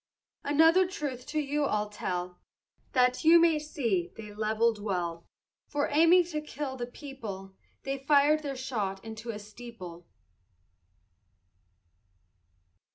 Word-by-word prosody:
Another 325 +5 +5
truth 290 -10 -5
to 310 - -1
you 295 0 0
I'll 210 -4 -1
tell, 180 -3 -4 0.5
That 250 -1 +3
you 330 +2 +8
may 330 -2 +4
see 230 - -1
they 210 -2 -9
levelled 220 +1 +1
well; 175 -5 -3 0.4
For 290 -1 -1
aiming 335 +4 +6
for 345 - -11
to 305 -1 -2
kill 290 -3 -5
the 240 -2 -4
people, 225 -8 -8 0.3
They 275 0 -3
fired 290 +2 +4
their 280 -2 -4
shot 215 -7 -3
into 220 +1 -8
a 220 - -3
steeple. 205 -5 -10
250 Hz, 125 wpm, -29 LUFS, 210-295 Hz, 0.5 s, you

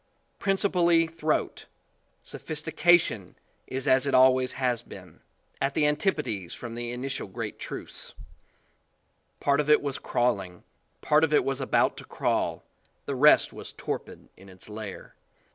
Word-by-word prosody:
Principally 180 -4 +3
throat, 160 -1 -2 0.6
sophistication 160 - +1 0.3
is 130 0 -4
as 130 +2 +4
it 140 - +2
al 130 0 +7
ways 130 0 -1
has 125 -3 0
been - - -13 0.4
at 135 +1 0
the 150 - +3
antipodes 150 - -1
from 120 -2 -8
the 120 0 -4
init 130 +2 -4
ial 95 - -8
great - - -5
truths. - - -7 1.2
"Part 140 0 +2
of 150 0 0
it 150 - +7
was 140 -2 -4
crawling, 100 -8 -1 0.4
part 150 +1 +3
of 155 -1 +2
it - - +3
was 135 0 -2
about 135 - +2
to - - -9
crawl, - - -1 0.4
the 140 - -3
rest 145 +3 +5
was - - -9
torpid - - -6
in 95 +1 -16
its 95 0 -15
lair." 105 -2 -8
135 Hz, 145 wpm, -27 LUFS, 120-155 Hz, 1.2 s, al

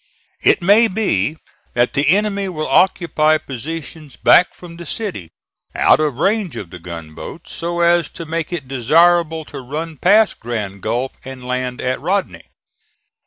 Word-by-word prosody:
It 180 - +3
may 210 +5 +6
be 170 - 0 0.4
that 120 0 +2
the 140 +1 +1
enemy 200 +1 +1
will 155 -4 -3
occupy 155 0 +3
positions 155 +2 -7
back 180 - +5
from 170 -2 -12
the 170 - -9
city, 140 - -4 0.5
out - - +4
of 150 -5 0
range 195 - 0
of 100 -7 -7
the 90 - -9
gunboats, 85 - -9
so 170 +1 -3
as 170 -2 +3
to 165 - -7
make 165 +1 -3
it 155 -7 -5
desirable 160 +5 +3
to 140 -2 -8
run 155 +5 -5
past 210 +8 +4
Grand 105 -5 -4
Gulf 125 +6 -1
and 130 -1 -9
land 125 0 -3
at 130 0 -2
Rodney. 195 +1 -2
155 Hz, 155 wpm, -18 LUFS, 125-175 Hz, 0.5 s, may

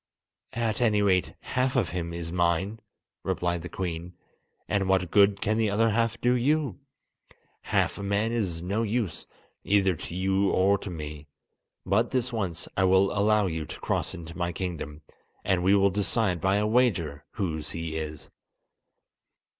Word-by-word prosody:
"At 115 0 0
any 105 -3 +3
rate 95 -3 +2
half 130 0 0
of 120 -8 +2
him 85 -2 -3
is 85 -1 -5
mine," 90 +5 0 0.4
replied 85 -1 -1
the 90 - -7
Queen, 90 -1 -5 0.5
"and 100 -2 0
what 95 -3 +2
good 100 0 +4
can 110 +1 +1
the 110 -2 +2
other 110 +2 +2
half 115 +1 0
do 125 +1 +3
you? 135 - +1 0.8
Half - - 0
a - - -4
man 100 +3 0
is 95 -8 -1
no 100 +5 -1
use, 110 -6 -2 0.4
either 95 -2 +3
to 85 - -8
you 95 +1 +2
or 100 +2 +3
to - - -6
me! 75 -3 -7 0.6
But 105 +5 +2
this 125 -2 -1
once 95 -7 -3
I 95 - +2
will 95 +1 +4
allow 105 0 +3
you 80 -3 -2
to - - -8
cross - - -1
into 85 0 -9
my 85 -1 -1
kingdom, 80 -4 -5 0.4
and 95 -2 +2
we 95 +3 +4
will 100 0 +4
decide 100 -2 0
by 95 +2 +2
a 105 +1 +2
wager 95 - +1
whose 80 -8 -3
he 80 -1 -4
is." 75 -2 -5
95 Hz, 165 wpm, -27 LUFS, 85-110 Hz, 0.8 s, good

